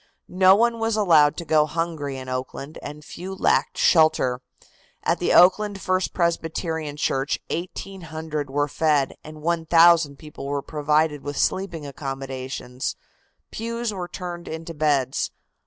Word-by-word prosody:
No 185 +1 +5
one 230 +2 +2
was 225 -1 0
allowed 160 -8 +4
to 170 - -5
go 155 -1 +3
hungry 160 -4 -3
in 130 0 -8
Oakland 130 +3 -5
and 150 +1 -8
few 190 +2 -7
lacked - - +1
shelter. 155 -7 +3 0.6
At - - +1
the - - +1
Oakland 200 +3 +5
First 185 -1 0
Presbyterian 165 -3 -2
Church 135 -1 0
1,800 160 -4 -5
were 145 +2 0
fed 145 -3 +1
and 155 0 -11
1,000 165 -2 +4
people 150 -2 -9
were 140 0 -2
provided 150 0 +1
with 145 0 -5
sleeping 170 -5 -1
accommodations. 135 -2 -5 0.6
Pews 230 0 -3
were 180 -3 -4
turned 175 -1 -7
into 160 +1 -6
beds. 145 -4 +1
160 Hz, 135 wpm, -24 LUFS, 145-175 Hz, 0.6 s, No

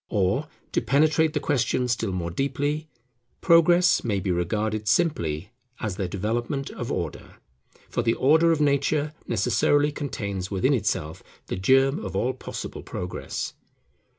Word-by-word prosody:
Or, 105 +9 +1 0.2
to - - +1
penetrate 155 +3 +3
the - - 0
question 130 -2 0
still 115 -4 -1
more 85 -2 -3
deeply, 145 - -1 0.5
Progress 175 +1 +5
may 105 -4 0
be 95 0 -1
regarded 105 +5 -1
simply 95 - 0 0.3
as 105 -4 -3
the 95 -1 -2
development 120 - -2
of 120 - -5
Order; 85 -4 -4 0.5
for - - -1
the 115 -1 +1
order 160 +5 +4
of 160 - +1
nature 145 +1 +1
necessarily 145 +7 +2
contains 100 -10 -4
within 95 -2 +1
itself 75 +1 -1 0.2
the - - -4
germ 135 - +3
of - - -5
all 130 +2 +1
possible 130 - -7
progress. 90 0 -5
125 Hz, 140 wpm, -25 LUFS, 95-145 Hz, 0.5 s, Progress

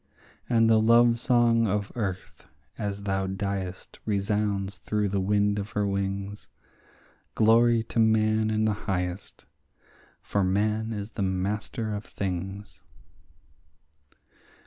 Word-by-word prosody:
And 115 -2 +4
the 110 -1 +5
love 115 +1 +5
song 120 -2 +3
of 100 0 -1
earth 95 -6 -5 0.3
as 100 -1 -4
thou 95 -1 -1
diest 95 -1 -4
resounds 100 -1 -1
through 105 -1 -1
the 100 0 0
wind 105 +1 +1
of 100 +2 -6
her 105 0 0
wings— 100 +1 -3 0.9
Glory 115 +1 +4
to 115 - -3
Man 110 0 +3
in 110 0 +1
the 110 - +2 0.2
highest! 90 0 -3 0.8
for 100 - 0
Man 105 +4 0
is 105 0 -5
the 105 - -5
master 105 +4 -2
of 105 0 -4
things. 95 +2 -5
105 Hz, 120 wpm, -27 LUFS, 100-110 Hz, 0.9 s, the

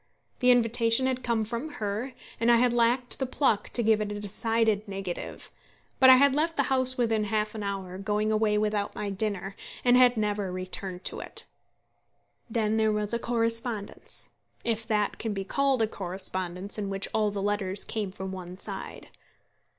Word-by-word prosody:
The 250 - +3
invitation 235 0 +4
had 260 -1 0
come 235 -3 0
from 235 +8 -5
her, 220 +3 -3 0.3
and 230 - +2
I - - +7
had 240 +1 +3
lacked 240 +1 +2
the 265 - -1
pluck 245 -6 +1
to 240 - +3
give 220 -1 +3
it 210 -1 -2
a 205 - -4
decided 215 +1 0
negative; 195 -3 -6 0.5
but 260 - +8
I 260 - +11
had 280 +1 +5
left 325 +3 0
the 280 - +3
house 255 0 +3
within 225 -3 +1
half 215 0 -1
an 220 - -5
hour, 190 -2 -4
going 210 +2 0
away 215 -1 +2
without 210 -1 -1
my 205 -1 -3
dinner, 195 -1 -2 0.3
and 245 0 +6
had 250 -1 +5
never 205 -3 -1
returned 185 0 -5
to - - -2
it. - - -5 1.0
Then 220 -1 0
there 220 -1 +3
was 210 +1 0
a 235 - 0
correspondence, 230 -2 -1 0.3
if 225 -1 -2
that 210 -2 0
can 220 -2 -2
be 195 - -2
called 270 +3 +1
a - - +2
correspondence 185 0 -3
in 200 -1 -3
which 195 0 0
all 215 -1 +2
the 205 0 -4
letters 200 -1 0
came 215 -4 -2
from 190 0 -6
one 180 -1 -8
side. - - -7
215 Hz, 180 wpm, -28 LUFS, 200-235 Hz, 1.0 s, I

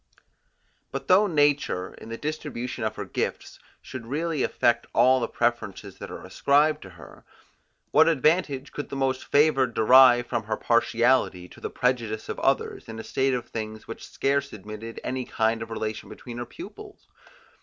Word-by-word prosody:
But 135 0 -5
though 195 +3 +5
nature 145 - +1
in - - -12
the 115 - -5
distribution 130 -5 -4
of 110 - -2
her - - -5
gifts - - -4 0.2
should 125 -3 -8
really 155 +2 -1
affect 120 -1 +1
all 130 0 +5
the 115 - -1
preferences 120 -5 -2
that - - -7
are - - -8
ascribed 150 +2 +2
to 95 - -10
her, - - -14 0.7
what 160 - +6
advantage 155 -2 +1
could 145 - -6
the - - -5
most 135 -1 0
favoured 135 -5 +3
derive 120 +1 +7
from 120 -3 -3
her 110 0 -2
partiality, 115 -5 +2
to - - -15
the - - -3
prejudice 115 -4 -1
of - - -4
others, - - 0
in 110 - -7
a 110 - -6
state 135 -1 0
of 125 - -5
things, 110 -1 -6
which 115 - -8
scarce 140 0 0
admitted 110 +2 -8
any 130 0 -2
kind 115 -1 0
of 115 - -6
relation 110 -1 -4
between 120 -1 -9
her 120 - -5
pupils? 400 +4 -11
125 Hz, 170 wpm, -26 LUFS, 115-140 Hz, 0.7 s, derive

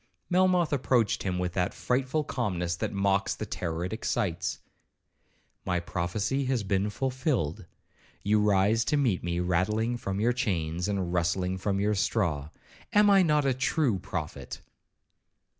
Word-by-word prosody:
Melmoth 180 -3 +3
approached 125 -5 +2
him 90 -2 -1
with 90 -1 -2
that 90 -1 -1
frightful 130 +4 0
calmness 90 - -2
that 90 - -3
mocks 100 -1 +1
the - - -5
terror 85 -1 -3
it 95 - -4
excites. 105 -6 -1 1.1
'My 90 -1 0
prophecy 100 +10 -2
has 130 -4 0
been 100 +1 0
fulfilled;—you 105 - -2
rise 105 +2 +3
to 150 - +1
meet 120 -10 +1
me 85 0 -1
rattling 105 +7 0
from 100 -4 -3
your 120 +3 +2
chains, 90 -8 -1
and 95 -4 -1
rustling 90 +2 0
from 100 0 -1
your 105 +1 +2
straw—am 90 - 0
I 195 -1 +7
not 150 -4 +3
a 135 - +3
true 130 - +1
prophet?' - - -5
100 Hz, 140 wpm, -28 LUFS, 90-125 Hz, 1.1 s, I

